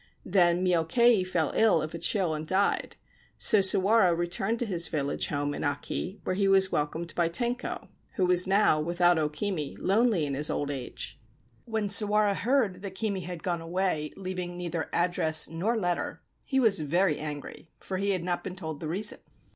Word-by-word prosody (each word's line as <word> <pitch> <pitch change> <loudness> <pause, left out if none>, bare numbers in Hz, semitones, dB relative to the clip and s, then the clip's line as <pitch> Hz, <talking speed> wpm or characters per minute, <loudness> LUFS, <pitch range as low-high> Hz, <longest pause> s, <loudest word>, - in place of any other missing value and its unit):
Then 180 -1 +2
Myokei 185 +6 +3
fell 165 -5 -1
ill 215 -7 +4
of 155 0 -5
a 170 - -5
chill 185 -5 +1
and 155 0 -5
died: 195 +3 0 0.4
so 215 - +5
Sawara 190 -1 +4
returned 185 +6 -1
to 240 - -2
his 175 -6 +3
village 145 -4 -1
home 145 0 -2
in - - -5
Aki, 175 +6 -3
where - - -2
he 195 +1 +1
was 190 -1 +4
welcomed 160 +3 -2
by 170 -1 +1
Tenko, 240 +7 -2 0.3
who 185 - +1
was 180 0 +4
now, 195 -5 +3
without 175 +1 +2
O 150 -1 0
Kimi, 155 -2 -3
lonely 210 -5 +1
in 140 - -3
his 145 +3 +1
old 145 0 -2
age. 130 -3 -6 0.5
When 220 -3 -2
Sawara 210 0 +3
heard 220 -4 0
that 195 -2 -7
Kimi 200 -1 -2
had 175 -2 -7
gone 175 -2 -2
away 165 -3 -1
leaving 180 -2 -5
neither 170 -2 -4
address 170 -3 +1
nor 190 +9 -2
letter 180 -4 -2 0.2
he 265 - 0
was 220 -7 +3
very 165 +2 +1
angry, 150 +1 -7
for 190 - -5
he 200 +1 -1
had 185 -3 0
not 175 0 -2
been 185 - -6
told 160 -5 -6
the 155 - -5
reason. 200 +6 -1
180 Hz, 185 wpm, -28 LUFS, 160-200 Hz, 0.5 s, so